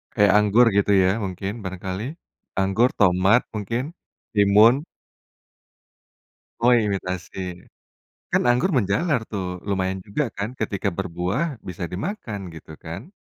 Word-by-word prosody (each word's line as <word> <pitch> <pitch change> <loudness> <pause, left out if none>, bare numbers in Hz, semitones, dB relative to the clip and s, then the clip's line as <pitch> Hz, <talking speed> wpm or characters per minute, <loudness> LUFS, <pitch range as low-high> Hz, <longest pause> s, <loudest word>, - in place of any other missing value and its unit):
Kayak 105 -2 +5
anggur 105 +4 +5
gitu 100 0 +3
ya? 90 - +3
Mungkin 95 +1 -4
barangkali, 95 +2 -5 0.6
anggur, 105 +6 +3
tomat 95 +4 +4
mungkin, 115 +4 -2 0.5
timun. 105 +7 +5 1.8
Oh, 120 +1 +5
imitasi, 95 -5 -2 0.9
kan - - +2
anggur 125 +11 +2
menjalar 125 - +1
tuh 100 -3 -3 0.2
lumayan 95 -1 -1
juga 100 +9 -1
kan? 100 +2 -2
Ketika 100 -2 -1
berbuah 90 - -1 0.2
bisa 90 -1 -5
dimakan 110 - -4
gitu 80 0 -11
kan? 95 - -7
100 Hz, 115 wpm, -23 LUFS, 95-115 Hz, 1.8 s, Kayak